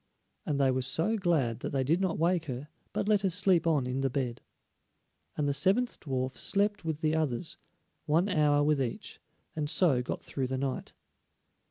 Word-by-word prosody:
and 145 -3 0
they 135 -1 +4
were 130 0 0
so 160 - +1
glad 160 - +1
that - - -4
they 135 -1 +1
did 165 +8 +1
not 190 -3 0
wake 170 +1 +1
her, 135 +1 -6 0.2
but - - -2
let 210 -2 +3
her 195 - +1
sleep 180 -2 +2
on 150 -6 +2
in 125 +2 -2
the 135 - +1
bed. 125 -2 -3 1.0
And 150 - 0
the 140 - +1
seventh 215 - +1
dwarf 130 -2 -2
slept 205 0 +1
with 160 -2 -3
the 155 0 +1
others, 155 -1 -2 0.5
one 165 +6 +3
hour 150 -6 +3
with 150 -1 +2
each, 120 -3 -4 0.4
and 150 -2 -2
so 150 -7 +3
got 125 - -5
through 135 -2 -3
the 130 +1 -2
night. 135 -1 -3
150 Hz, 190 wpm, -30 LUFS, 130-175 Hz, 1.0 s, they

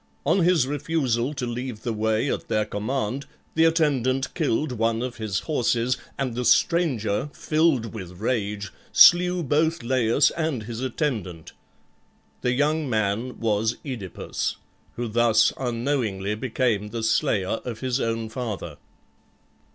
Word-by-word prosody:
On - - +3
his 175 -6 +4
refusal 140 -3 -1
to 135 -3 -3
leave 120 -1 -5
the 120 - -1
way 110 +3 0
at - - -6
their 105 0 +1
command 120 +5 -3 0.3
the 160 0 +4
attendant 135 -5 +1
killed 150 -3 0
one 115 0 0
of 125 -2 -5
his 110 -4 -2
horses, 125 -4 +1 0.2
and 135 -3 -2
the 125 +2 -2
stranger, 130 - +2
filled 155 -8 +1
with 90 -4 -8
rage, 105 -3 -2 0.2
slew 180 0 +6
both 155 +1 +1
Laius 125 +2 +3
and 155 -8 -2
his 115 +1 -6
attendant. 115 - -3 0.9
The 125 - +1
young 150 +2 +1
man 110 +2 -1
was 110 +1 0
OEdipus, 115 - -4 0.4
who 120 0 -3
thus 115 0 +3
unknowingly 115 -5 -1
became 115 -2 0
the 115 +1 -5
slayer 110 -2 +1
of 115 -3 -6
his 130 0 0
own 115 -1 -1
father. 110 - -5
120 Hz, 135 wpm, -24 LUFS, 110-140 Hz, 0.9 s, slew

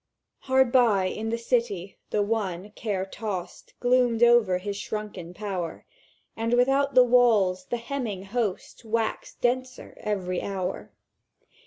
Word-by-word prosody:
"Hard 260 -2 +3
by, 225 -7 +4
in 215 +4 -3
the 230 - -1
City, 230 -6 -1
the 210 - +1
One, 205 -3 -2
care 205 -4 -3
tossed, 195 -3 -6
Gloomed 245 -2 +3
over 235 -6 +5
his 200 +2 -4
shrunken 205 -4 -5
power; 180 -4 -5 0.5
And 230 +1 -1
without 270 +3 +2
the 255 - +9
walls 220 -7 +3
the 240 - -2
hemming 235 -6 -4
host 210 +1 -3
Waxed 225 0 -2
denser 255 +1 -2
every 185 -4 -2
hour. 190 -2 -4
215 Hz, 130 wpm, -26 LUFS, 190-240 Hz, 0.5 s, the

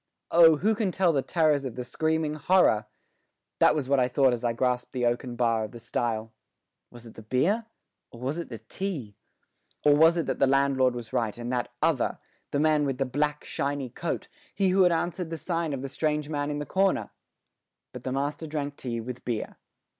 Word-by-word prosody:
Oh, 165 -2 +7
who 215 +8 +2
can 210 -3 0
tell 180 -2 +2
the 140 - +2
terrors 150 0 +2
of 130 -4 -5
the 125 - -4
screaming 160 +4 -1
horror! 150 - +3 0.7
That - - +5
was 145 -4 -2
what 140 0 +3
I 125 - +3
thought 130 0 +3
as 120 0 -4
I 120 - +2
grasped 125 +1 -1
the 125 -2 0
oaken 120 +1 -1
bar 115 -2 +1
of 110 - -7
the 120 - -9
stile. 115 0 -2 0.6
Was 120 -1 -13
it 115 - -12
the - - -11
beer 170 - 0 0.4
or 115 - -13
was 135 +7 -2
it 170 - -6
the 115 - -6
tea? 125 - -5 0.7
Or 145 -1 +7
was 165 +3 +5
it 165 - 0
that - - -2
the 135 - +4
landlord 135 -2 +3
was 120 -1 -7
right 115 -4 -1
and 120 +1 -4
that 125 -1 -2
other, - - +1 0.3
the 140 - -1
man 155 -1 +3
with 135 -3 -1
the 135 - 0
black, 150 +3 -1
shiny 140 -3 -3
coat, - - -4 0.3
he 195 -1 +2
who 190 +1 +3
had 180 -1 +5
answered 175 +1 -1
the 165 - -4
sign 165 0 -2
of 135 -2 -4
the - - -3
strange 150 +1 -1
man 145 -1 -2
in 145 - -2
the 150 - -4
corner? 195 +3 +1 0.8
But - - -8
the 130 - -3
master 145 +4 -2
drank 145 -2 -4
tea 120 -2 -4
with 125 +2 -7
beer. 115 -3 -4
140 Hz, 215 wpm, -27 LUFS, 120-160 Hz, 0.8 s, Oh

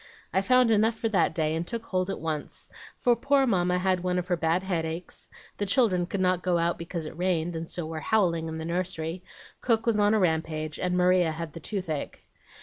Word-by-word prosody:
I 190 - +3
found 250 +3 +4
enough 220 +1 +3
for 225 0 -1
that 185 -6 +2
day, 155 -1 +1
and 165 +1 -3
took 230 -1 -3
hold 185 -2 -1
at 195 - -3
once; 155 -2 -2 0.3
for 240 -1 +3
poor 275 +1 +3
Mamma 180 -6 +2
had 185 0 +1
one 180 0 -1
of 180 +1 -3
her 175 - +3
bad 165 +2 +1
headaches, 170 -2 -3 0.3
the 205 - -2
children 195 -5 +2
could 195 - -3
not 185 -1 +2
go 180 -1 +1
out 170 0 0
because 170 -1 -5
it 155 - -7
rained, 175 -1 0
and 165 0 -5
so 175 -2 -4
were 160 0 -5
howling 170 -4 +1
in 160 0 -5
the 160 - -5
nursery, 175 -1 -3 0.4
cook 230 -2 +1
was 225 -3 +2
on 205 +1 +4
a - - +3
rampage, 160 -3 -1
and 180 0 0
Maria 180 -2 +4
had 160 -1 -6
the - - -7
toothache. 165 -5 -4
180 Hz, 220 wpm, -27 LUFS, 165-195 Hz, 0.4 s, found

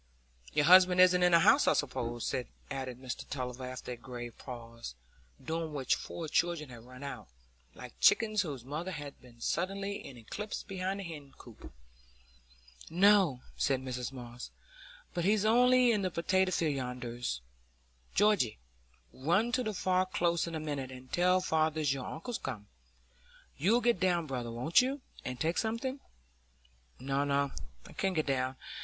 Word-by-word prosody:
"Your 145 - +3
husband 180 +1 +7
isn't 180 0 +6
in 180 0 +5
the 170 -1 +6
house, - - +5
I - - +6
suppose?" 120 -4 -2 0.4
added 130 -2 -4
Mr 130 -2 -6
Tulliver 125 -1 -4
after 130 0 -6
a - - -3
grave 120 -1 -8
pause, 115 - -8 0.5
during 160 -1 -2
which 135 -2 +1
four 165 -2 -4
children 165 -2 0
had 120 -2 -11
run 125 +2 -11
out, 140 - -6 0.5
like - - -10
chickens 215 -2 +4
whose 140 -9 -5
mother 155 +7 -4
has 145 -5 -6
been 120 -2 -17
suddenly 195 +7 -2
in 130 - -10
eclipse 205 - -5
behind 190 0 -3
the - - -4
hen 150 -6 -9
coop. 120 -4 -13 1.2
"No," 185 -6 +5
said 135 -1 +1
Mrs 125 -1 -4
Moss, 125 -2 -8 0.6
"but 175 - -1
he's 210 +2 +3
only 250 +2 +5
in 210 -3 +1
the 185 - 0
potato 185 +2 +1
field 160 -5 0
yonders. 125 - -4 0.7
Georgy, 205 - +3 0.6
run 175 - +1
to 255 - +1
the 220 -3 -1
Far 185 -1 +1
Close 170 -2 +1
in 165 - -5
a - - -2
minute, 145 -4 -4
and 130 0 -12
tell 180 +1 +4
father 160 -3 +1
your 135 -3 0
uncle's 230 +9 -5
come. 110 -6 -5 0.9
You'll 215 - +3
get 240 -6 +2
down, 175 -2 +2
brother, 125 -4 -4
won't 125 - +4
you, 270 +2 -2 0.2
and 125 -1 -5
take 165 +6 +1
something?" 235 +5 -2 1.0
"No, 135 +2 0
no; 140 -1 +1 0.3
I - - -12
can't 190 -1 -1
get 155 - +1
down. 130 -1 0
155 Hz, 160 wpm, -32 LUFS, 130-185 Hz, 1.2 s, husband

